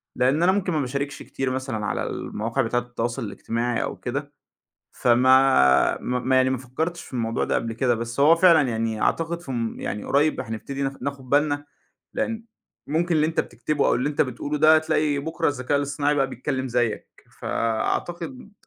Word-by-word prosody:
لأن 130 +6 +2
أنا 180 - +5
ممكن 190 -2 0
ما 155 - +1
باشاركش 140 +2 -3
كتير 135 -1 -3
مثلًا 130 -5 -3
على - - -1
المواقع 115 +5 -2
بتاعة 120 0 0
التواصل 120 -1 -4
الاجتماعي 115 +3 -2
أو - - -4
كده. 140 +3 -5 0.6
فما 125 - +4
ما 125 0 -1
ما 130 +1 +1
يعني 130 0 +4
ما 130 - 0
فكرتش 160 +8 -4
في - - -15
الموضوع 115 -2 -1
ده - - -1
قبل 115 0 -1
كده 120 +2 +1
بس 115 +3 -4
هو 150 +4 +7
فعلًا 165 -6 +5
يعني 110 -1 -2
أعتقد 165 +1 0
فم 120 -6 -4
يعني 105 - -4
قريب 150 +2 +2
هنبتدي 115 +5 -5
ناخ 135 0 -1
ناخد 140 -1 -5
بالنا؛ 145 0 +3 0.5
لأن 225 -1 -2 0.4
ممكن 170 +3 0
اللي 155 -1 +3
أنت 160 +1 0
بتكتبه 150 -2 -1
أو - - +3
اللي 130 +4 0
أنت 150 - -2
بتقوله 145 +3 -3
ده 155 +1 +7
تلاقي 155 -2 0
بُكرة 160 +3 -1
الذكاء 145 0 -1
الاصطناعي 145 +1 0
بقى 135 -2 +2
بيتكلم 130 +1 -3
زيّك، 120 -2 -1 0.3
فأعتقد 175 - -2
135 Hz, 175 wpm, -24 LUFS, 120-150 Hz, 0.6 s, هو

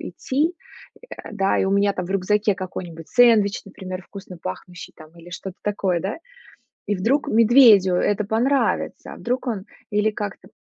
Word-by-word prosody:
идти, 300 +7 -2 0.5
э, - - -14
а, - - -10
да, 195 -2 +1
и - - +1
у 190 - 0
меня 200 0 +3
там 180 -2 -4
в 190 - -6
рюкзаке 205 +2 +1
какой-нибудь 175 -4 -7
сэндвич, 225 -5 +4
например, 185 -2 -8
вкусно 190 -1 -11
пахнущий 175 - -8
там 155 -1 -14
или 175 +1 -14
что-то 190 +1 -7
такое, 195 -4 0
да, 195 - -3 0.7
и 205 - 0
вдруг 235 +10 0
медведю 220 -5 +6
это 205 +3 +1
понравится. 240 +7 0
А - - -12
вдруг 250 +2 -3
он 210 -5 -3 0.3
или 210 +1 +2
как-то 205 -1 -6
200 Hz, 170 wpm, -22 LUFS, 185-225 Hz, 0.7 s, медведю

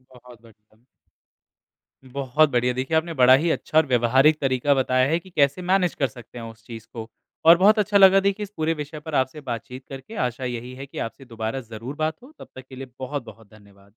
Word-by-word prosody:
बहुत 120 -1 -16
बढ़िया। 110 -1 -23 1.3
बहुत 140 +3 +1
बढ़िया, 125 -1 +1
देखिए 130 +6 -1
आपने 165 +1 -2
बड़ा 130 -3 +6
ही 165 +5 0
अच्छा 155 - -2
और 160 - +5
व्यवहारिक 130 +4 +3
तरीका 135 +1 +2
बताया 130 -1 +2
है 165 - +2
कि 185 - -17
कैसे 145 0 +1
मैनेज 180 -1 +1
कर 135 - 0
सकते 120 0 -14
हैं 115 - -7
उस 115 0 -13
चीज़ 115 -1 -10
को, 115 -1 -7 0.4
और 165 +1 +9
बहुत 210 +4 +5
अच्छा 210 0 +2
लगा 195 0 +7
देखिए 200 +2 -1
इस 200 - -7
पूरे 160 +1 0
विषय 150 0 -7
पर 150 0 -6
आपसे 130 +4 -1
बात-चीत 125 0 -7
करके 135 +12 -9
आशा 125 +2 -7
यही 125 0 -5
है 135 +2 -8
कि 135 - -13
आपसे 125 +4 -6
दोबारा 115 +1 -4
ज़रूर 115 +4 -8
बात 155 +1 -1
हो, 270 - -15
तब - - -11
तक 130 0 -10
के 130 - -11
लिए 130 0 -8
बहुत 140 +1 -4
बहुत 110 -1 -14
धन्यवाद। 100 -2 -20
130 Hz, 220 wpm, -23 LUFS, 120-155 Hz, 1.3 s, और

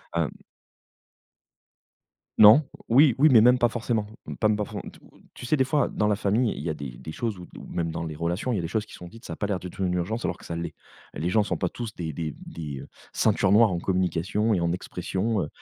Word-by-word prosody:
hem 85 -4 +1 2.1
Non. 110 +8 +9 0.3
Oui, 130 +1 +6
oui, 155 +3 +6
mais 115 - +8
même 125 +3 +6
pas 120 - +3
forcément. 115 -2 -2 0.2
Mmh - - -5
pas 110 - +2
m 105 - +2
pas 105 - -1
fo - - -7
t - - -9
heu, - - -21
tu 125 - -8
sais, 155 - +2
des 130 - +3
fois, 145 +2 +1
dans 105 - -1
la 105 -1 +2
famille, 110 +3 +1
il - - -7
y 85 - -3
a 80 - -1
des 70 -5 -8
des 80 - -8
choses 110 +1 -3
ou 90 - -9
ou - - -10
même 85 -1 -2
dans 80 - -4
les 80 -1 -5
relations, 85 +10 -2
il - - 0
y - - -1
a - - -2
des 85 - -3
choses 105 +4 -1
qui - - -17
sont 90 - -10
dites, 115 +5 -15
ça - - -6
a - - -6
pas 105 - -2
l'air 100 -3 -1
d'être 90 +2 -9
une 90 -1 0
urgence 105 +7 -2
alors - - -2
que - - -16
ça 85 - -5
l'est. 85 0 -5 0.4
Les 85 +5 -2
gens 110 +2 +3
sont - - -2
pas 90 - -1
tous 115 -3 -6
des 80 -3 -4
des 75 0 -4
des 75 -5 -7 0.3
ceintures 100 -2 +2
noires 110 +1 +6
en 85 - -1
communication 95 +4 0
et 90 - +2
en 85 0 +1
expression, 95 +4 -2
heu, 75 - -4
100 Hz, 265 wpm, -26 LUFS, 85-115 Hz, 2.1 s, Non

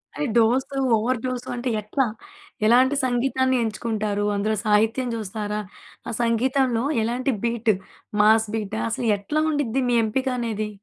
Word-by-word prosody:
అది 295 - -1
dose, 250 +4 +2 0.2
over 235 +3 0
dose 255 0 -3
అంటే 245 +1 -2
ఎట్లా? 255 +6 0 0.6
ఎలాంటి 255 +5 +5
సంగీతాన్ని 260 +1 +1
ఎంచుకుంటారు? 215 -2 -2
అందులో 215 +2 0
సాహిత్యం 225 +4 +2
చూస్తారా? 210 -1 -4 0.5
ఆ - - -3
సంగీతంలో 240 +1 +1 0.2
ఎలాంటి 250 +4 0
బీటు? 230 -2 +1 0.5
Mass 220 +1 +5
beta? 195 - -3
అసలు 240 - -2
ఎట్లా 300 +10 -1
ఉండుద్ది 270 -3 0
మీ 240 - +2
ఎంపిక 260 +5 -1
అనేది? 215 -2 -2
235 Hz, 135 wpm, -23 LUFS, 215-260 Hz, 0.6 s, ఎలాంటి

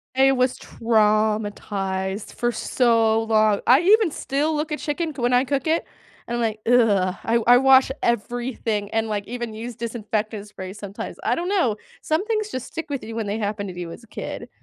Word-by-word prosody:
I 270 0 +5
was 255 -1 +1
traumatized 210 -3 0
for 240 0 0
so 225 -1 +2
long, 215 -2 +3
I 265 +6 +7
even 410 -2 +4
still 295 +4 -1
look 300 +1 -2
at 300 - -2
chicken 310 +1 -2
c 255 - -6
when 245 +1 +2
I 250 +1 +5
cook 275 +2 -2
it, 325 +1 +1 0.4
and 240 0 -2
I’m - - -1
like, 220 -1 -1
"ugh," 205 -6 +3
I 230 - +1 0.2
I - - +7
wash 265 0 +5
everything 235 -2 -1
and, 225 0 +1
like, 205 -1 -2
even 240 -2 -5
use 235 +2 -6
disinfectant 215 -2 -3
spray 190 -2 -8
sometimes, 200 -1 -7
I - - +2
don't 350 +2 -3
know, 245 - +2 0.3
some 315 +6 0
things 430 -1 -1
just 255 -1 -5
stick 325 0 -5
with 280 -2 -3
you 225 +1 -7
when 220 -3 -2
they 205 +2 -2
happen 205 -1 -4
to 180 -1 -7
you 170 - -5
as 230 - -11
a 230 - -17
kid. - - -6
230 Hz, 200 wpm, -23 LUFS, 210-265 Hz, 0.4 s, I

